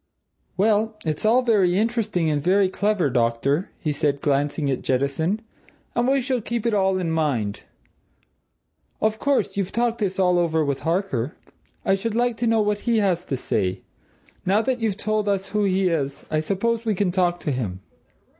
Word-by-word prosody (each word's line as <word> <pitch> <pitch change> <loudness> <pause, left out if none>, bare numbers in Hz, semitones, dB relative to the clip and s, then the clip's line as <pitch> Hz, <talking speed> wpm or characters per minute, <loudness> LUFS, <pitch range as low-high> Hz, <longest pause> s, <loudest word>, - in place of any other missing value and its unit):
"Well 215 +2 +2
it's 155 +6 -1
all 245 +3 +4
very 195 -7 +3
interesting 215 -6 0
and 150 -2 +1
very 190 +4 +3
clever, 205 -3 +1
doctor," 125 +7 +1
he 155 - -2
said, 145 -1 0
glancing 145 +1 0
at 130 - -2
Jettison. 140 +10 0 0.5
"And 240 +1 +1
we 270 0 +3
shall 255 -1 -1
keep 235 +1 -3
it 230 - +1
all 190 -2 +2
in 175 -3 -1
mind. 135 -11 -1 1.3
Of 220 0 0
course, 280 -7 0
you've 195 -2 -1
talked 235 0 0
all 205 - +3
this 190 +1 -7
over 175 -4 +2
with 140 -1 -1
Harker? 165 - -1 0.5
I - - +3
should 210 +3 -1
like 240 0 +1
to 235 0 0
know 225 -1 +3
what 210 0 0
he 230 - +3
has 185 -5 +1
to 135 - -2
say. 95 -6 -1 0.6
Now 200 +4 +2
that 260 0 0
you've 220 -4 -1
told 215 -1 0
us 195 -1 -1
who 210 0 +1
he 190 0 +2
is, 140 -4 -2
I 155 - +2
suppose 225 +8 -1
we 220 -3 0
can 185 -1 +1
talk 175 -1 +1
to 150 - -1
him?" 105 -8 -3
190 Hz, 185 wpm, -23 LUFS, 155-220 Hz, 1.3 s, all